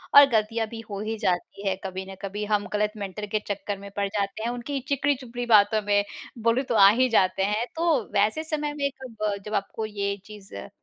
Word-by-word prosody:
और 285 - +12
गलतियाँ 225 -1 +1
भी 225 +1 -8
हो 200 -1 -4
ही 220 +1 -3
जाती 200 0 -1
है 190 - +2
कभी 190 0 -4
न - - -8
कभी, 205 +1 -4
हम 210 -1 0
गलत 210 0 +1
मेंटर 205 +1 -5
के - - +3
चक्कर 205 0 -3
में 200 0 -9
पड़ 200 -1 0
जाते 200 +1 -2
हैं। 235 - 0
उनकी 245 +3 -3
चिकनी-चुपड़ी 265 -4 -1
बातों 215 -1 +5
में 205 0 +2 0.4
बोलूँ 235 +4 +3
तो 235 - +1
आ 195 -2 +9
ही 255 +5 +3
जाते 190 -4 +3
हैं, 210 +4 +1
तो 325 -5 +2
वैसे 210 +9 +2
समय 300 -2 -2
में 280 -1 0
कब 215 -5 -3
जब 210 - -6
आपको 205 +2 -2
ये 200 -1 -2
चीज़ 210 - -12
अ, 100 - -7
215 Hz, 215 wpm, -26 LUFS, 200-240 Hz, 0.4 s, और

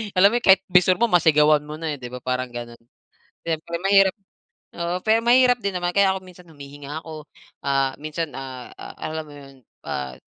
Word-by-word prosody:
Alam 190 +2 +6
mo - - -1
yun, - - -8
kahit 190 0 +6
bisor 180 0 +5
mo 235 +4 0
masigawan 150 -3 +4
mo 150 - -6
na 160 0 -4
eh, 145 - -8
'di 125 - -7
ba, 125 0 -9
parang 130 0 -2
ganun. 120 -1 -8 0.7
Siyempre 165 +1 -3
mahirap 195 0 +4 0.6
oo, 170 +1 -3
pero 220 +1 +4
mahirap 250 +1 +5
din 200 -1 -2
naman 175 0 -1
kaya 195 -1 +4
ako 190 - -4
minsan 180 -1 -15
humihinga 145 0 -9
ako, 155 -2 -10 0.4
ah, 135 -1 +1
minsan, 155 +2 -4
ah, 130 -2 -8
a - - -10 0.3
alam 160 0 -5
mo - - -12
'yon, 135 -1 -14 0.3
ah, 65 -1 -4
160 Hz, 200 wpm, -22 LUFS, 140-185 Hz, 0.7 s, Alam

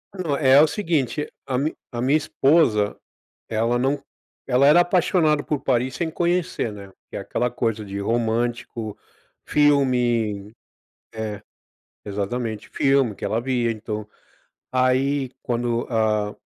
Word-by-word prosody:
Não, 160 -7 -1
é 135 -1 +6
o 155 - +5
seguinte: 150 - -1 0.2
a 130 - 0
mi 145 +4 0 0.2
a 120 - -5
minha 135 +5 +3
esposa, 135 -9 +2 0.5
ela 115 +2 0
não 135 +2 0 0.4
ela 130 +1 +4
era 150 +5 +7
apaixonada 175 -4 +2
por 150 -3 -2
Paris 125 0 0
sem 165 -2 -2
conhecer, 175 -8 -1
né? 100 -1 -10 0.2
Que - - -7
é - - -3
aquela 125 - -1
coisa 115 -3 -2
de 100 0 -6
romântico, 115 0 -1 0.5
filme 120 -8 +2 0.6
é, 110 -2 -5 0.6
exatamente. 105 +2 -3
Filme 135 -5 +2
que - - -9
ela 115 +2 0
via. 120 -2 0
Então 105 -1 -5 0.7
aí, 130 +1 +1
quando, 120 0 -1
ah, 105 -3 0
125 Hz, 130 wpm, -23 LUFS, 110-140 Hz, 0.7 s, era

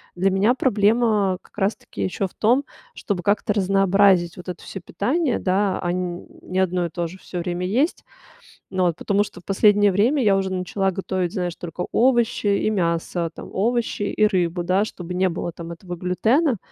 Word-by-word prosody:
для 185 +2 +2
меня 195 +5 +3
проблема 215 -5 +2
как - - -25
раз 200 +1 0
таки - - -9
ещё 190 +1 -1
в - - -22
том, 250 +6 +2 0.3
чтобы 190 - -3
как-то 210 +2 +1
разнообразить 195 -2 +3
вот 180 0 -9
это 180 - -6
всё 195 - -8
питание, 260 - -1
да. 190 +1 +1
А 175 - -1
н 180 -1 -4
не 185 +1 -3
одно 180 -1 +1
и - - -10
то 170 +1 -3
же 180 +3 -11
всё 180 - -6
время 175 +1 -3
есть. 255 - 0 0.7
Ну 185 -1 -1
вот, 170 -3 +1
потому 205 +2 +1
что - - -11
в - - -27
последнее 205 +1 +4
время 235 +9 +2
я 200 -4 +4
уже 190 -1 -1
начала 190 +1 -1
готовить, 185 -2 -2
знаешь, 180 -4 -3
только 175 +1 -5
овощи 240 -3 +2
и 200 +1 +2
мясо, 170 -3 -1
там. - - -9
Овощи 230 +1 0
и 215 +1 +2
рыбу, 175 -3 0
да, 185 +4 +2
чтобы 180 -4 -7
не 185 +1 +2
было 175 0 -4
там 170 0 -8
этого 175 +1 -8
глютена. 225 - +1
190 Hz, 195 wpm, -22 LUFS, 180-210 Hz, 0.7 s, последнее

